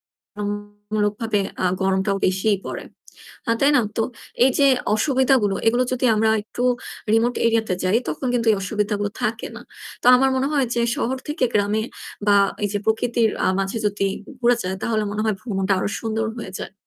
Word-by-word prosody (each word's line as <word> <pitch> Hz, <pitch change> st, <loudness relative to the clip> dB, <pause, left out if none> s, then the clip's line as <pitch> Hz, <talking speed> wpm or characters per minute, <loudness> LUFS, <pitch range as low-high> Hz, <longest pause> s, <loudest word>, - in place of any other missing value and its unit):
তুলনামুলক 205 Hz, 0 st, -4 dB, 0.5 s
আ -, -, +3 dB, 0.2 s
গরমটাও 190 Hz, +1 st, +1 dB
বেশিই 190 Hz, +2 st, +1 dB
পড়ে। -, -, -5 dB, 0.6 s
আ -, -, +3 dB
তাই 280 Hz, +1 st, +5 dB
না? -, -, +5 dB, 0.2 s
তো 225 Hz, -, +2 dB, 0.4 s
এইযে 265 Hz, +2 st, +3 dB, 0.3 s
অসুবিধাগুলো 260 Hz, -4 st, +2 dB
এগুলো 240 Hz, +3 st, +3 dB
যদি 255 Hz, 0 st, -1 dB
আমরা 220 Hz, +1 st, +3 dB
একটু 240 Hz, +3 st, -6 dB, 0.5 s
remote 235 Hz, +2 st, +2 dB
area 230 Hz, 0 st, +3 dB
তে 185 Hz, -, +1 dB
যাই 190 Hz, +5 st, +3 dB
তখন 260 Hz, -, -3 dB
কিন্তু 230 Hz, -1 st, 0 dB
এই 210 Hz, -, +3 dB
অসুবিধাগুলো 205 Hz, 0 st, -1 dB
থাকে 220 Hz, +1 st, -1 dB
না। -, -, -8 dB, 0.4 s
তো -, -, -2 dB
আমার 265 Hz, +1 st, +3 dB
মনে 265 Hz, +1 st, +1 dB
হয় 275 Hz, -4 st, +2 dB
যে 235 Hz, -, +1 dB, 0.2 s
শহর 260 Hz, -1 st, -1 dB
থেকে 295 Hz, -3 st, 0 dB
গ্রামে 210 Hz, +1 st, +2 dB, 0.4 s
বা 205 Hz, -, +5 dB, 0.3 s
এইযে 205 Hz, 0 st, -1 dB
প্রকৃতির 225 Hz, 0 st, +1 dB
আ -, -, +2 dB
মাঝে 195 Hz, +4 st, -2 dB
যদি 205 Hz, -1 st, -2 dB, 0.2 s
ঘু -, -, -13 dB
ঘুরা 240 Hz, 0 st, +4 dB
যায় 185 Hz, +1 st, -2 dB
তাহলে 220 Hz, -2 st, 0 dB
মনে 210 Hz, +1 st, -2 dB
হয় 215 Hz, -2 st, +1 dB
ভ্রমণটা 195 Hz, -4 st, -1 dB
আরও -, -, -1 dB
সুন্দর 225 Hz, 0 st, -1 dB
হয়ে 190 Hz, -5 st, -7 dB
যায়। -, -, -7 dB
215 Hz, 180 wpm, -22 LUFS, 205-240 Hz, 0.6 s, তাই